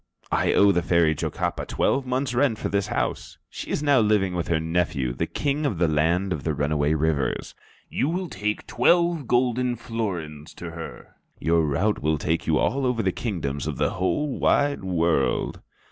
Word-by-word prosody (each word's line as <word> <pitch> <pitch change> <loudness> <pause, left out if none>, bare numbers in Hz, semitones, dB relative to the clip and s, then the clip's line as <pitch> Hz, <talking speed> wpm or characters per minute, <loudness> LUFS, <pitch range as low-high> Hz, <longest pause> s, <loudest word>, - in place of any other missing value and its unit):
I - - +2
owe 100 0 +6
the 90 -2 +1
Fairy 85 -2 +3
Jocapa - - -3
twelve 135 -1 0
months 130 0 -1
rent 125 -2 +2
for - - -3
this 100 0 0
house. - - -3
She - - -7
is 150 - -1
now 145 -3 +4
living 105 -4 +2
with 85 -2 -2
her 85 -2 +1
nephew, 80 -6 -1
the 65 - -2
King 145 +1 -1
of 135 - 0
the 85 0 +2
Land 85 +5 +1
of - - -5
the 80 -2 -1
Runaway 75 +1 +1
Rivers. 75 -3 -1 0.3
You 145 - -1
shall 185 -1 -3
take 105 - -3
twelve 170 -5 +2
golden 125 0 +1
florins 90 -10 -5
to 85 -1 -7
her. 85 0 -9 0.2
Your 80 0 +2
route 95 +9 0
will 80 +1 +1
take 80 +3 -1
you 80 -1 +3
over 135 - +1
all 130 -2 +1
the 115 - 0
kingdoms 75 - -3
of - - -3
the - - +1
whole 130 +10 -1
wide 145 -7 +2
world." 85 -6 0
90 Hz, 185 wpm, -25 LUFS, 80-125 Hz, 0.3 s, owe